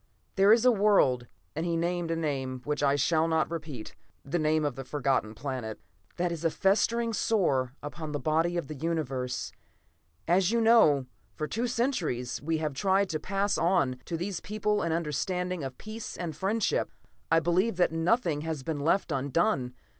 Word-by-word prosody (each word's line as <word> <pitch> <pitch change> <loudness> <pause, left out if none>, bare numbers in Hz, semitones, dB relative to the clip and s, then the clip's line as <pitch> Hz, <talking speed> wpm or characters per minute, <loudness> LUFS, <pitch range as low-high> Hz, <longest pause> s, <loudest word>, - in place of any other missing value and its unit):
"There 200 +1 +5
is 230 +2 +5
a 250 - +7
world" 195 - +3 0.3
and 160 - -2
he 170 -1 0
named 170 0 -1
a 165 - 0
name 135 -5 -2
which 150 +1 -2
I 140 -1 +3
shall 160 +3 +2
not 160 0 +1
repeat, 150 -9 -6 0.3
the 165 +5 -1
name 155 0 +2
of 145 -4 -1
the 135 - -6
Forgotten 130 -5 -1
Planet 125 -3 -5 0.4
"that 175 0 0
is 170 -1 -5
a 165 - +3
festering 230 +6 +1
sore 135 - +1
upon 150 +1 -6
the 145 - -2
body 160 +5 +1
of 170 - -2
the 155 - -6
Universe. 135 -5 -2 0.8
As 180 +2 +3
you 235 +1 +2
know, 220 - +5 0.3
for 155 - -3
two 235 +8 -1
centuries 230 - -1
we 160 +2 0
have 155 -2 -2
tried 195 +6 +2
to 155 -3 -2
pass 195 +4 0
on 150 -7 +2
to 165 - -3
these 180 +2 -3
people 210 0 -1
an 165 - -1
understanding 170 +2 -2
of 130 -1 -6
peace 215 +1 -7
and 170 -4 -4
friendship. 200 +6 0 0.4
I 165 - +5
believe 180 +6 +1
that 175 -2 +2
nothing 165 -1 +1
has 155 -3 -4
been 155 +1 -3
left 165 +4 +1
undone. 135 - 0
165 Hz, 180 wpm, -29 LUFS, 140-190 Hz, 0.8 s, a